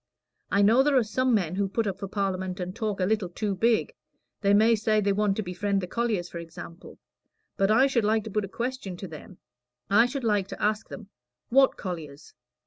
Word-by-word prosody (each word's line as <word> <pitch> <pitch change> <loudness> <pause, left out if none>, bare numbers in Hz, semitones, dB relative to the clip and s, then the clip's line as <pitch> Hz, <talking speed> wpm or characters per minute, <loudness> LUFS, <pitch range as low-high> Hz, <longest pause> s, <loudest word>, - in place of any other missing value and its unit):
I 200 - +3
know 225 +6 +5
there 280 0 +3
are 250 - +4
some 255 +4 0
men 180 -5 0
who 195 +1 -1
put 225 +3 -1
up 195 -1 -3
for 200 - -4
Parliament 190 -1 -2
and 180 +1 -5
talk 215 -4 -3
a 185 - +2
little 205 -2 0
too 205 +3 -2
big. 230 - +1 0.5
They 200 -2 +3
may 220 +3 +5
say 215 0 +2
they 200 -1 +1
want 205 -1 +1
to 215 - -1
befriend 195 +2 -1
the 185 - -3
colliers, 215 -3 -1
for 170 - -7
example. 170 +1 -10 0.6
But 195 0 +1
I 225 +5 +5
should 265 -5 +1
like 215 +1 +2
to 220 - -7
put 210 +1 0
a - - -4
question 235 -5 -4
to 190 - -7
them. 175 +4 -11 0.5
I 230 +4 +6
should 270 +1 -5
like 205 -4 +1
to - - -8
ask 215 +1 -1
them, 210 -2 -9 0.4
'What 270 +2 +4
colliers?' 155 -5 -7
205 Hz, 220 wpm, -27 LUFS, 190-225 Hz, 0.6 s, I